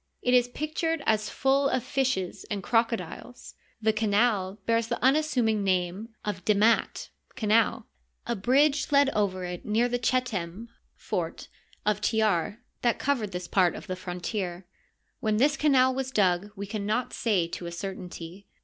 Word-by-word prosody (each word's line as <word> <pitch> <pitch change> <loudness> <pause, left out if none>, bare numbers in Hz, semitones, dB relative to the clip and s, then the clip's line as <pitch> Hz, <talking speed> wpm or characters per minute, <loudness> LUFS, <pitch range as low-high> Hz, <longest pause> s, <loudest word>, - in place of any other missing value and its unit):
It 250 - +2
is 245 -1 +5
pictured 310 +3 -2
as 215 -1 +1
full 275 +1 +2
of 255 -2 0
fishes 255 -10 -1
and 200 -2 -3
crocodiles. 230 0 -2 0.3
The 220 0 +3
canal 210 -2 +1
bears 230 0 +1
the - - -2
unassuming 255 -7 +2
name 185 +3 -1 0.2
of 195 -4 -3
demat 215 +3 +2
" - - -33
canal." 225 -1 +2 0.4
A 235 - -1
bridge 275 +9 +2
led 280 -1 +5
over 190 -3 0
it 180 0 -6
near 225 +3 +2
the 245 0 -1
Chetem 230 -5 -1 0.3
(fort) - - -4 0.4
of 210 0 +1
Tjar 215 0 +1 0.2
that 240 -1 +2
covered 245 -8 -1
this 180 -1 -5
part 180 -3 +3
of - - -8
the 185 - -4
frontier. 180 0 -4 0.5
When 215 -1 0
this 285 +5 +3
canal 260 -4 +4
was 260 0 -2
dug 195 -4 +2
we 200 0 -5
can 205 0 -4
not 235 +4 -1
say 195 -7 +1
to 175 - -6
a - - -5
certainty. 180 0 -7
215 Hz, 160 wpm, -27 LUFS, 190-250 Hz, 0.5 s, is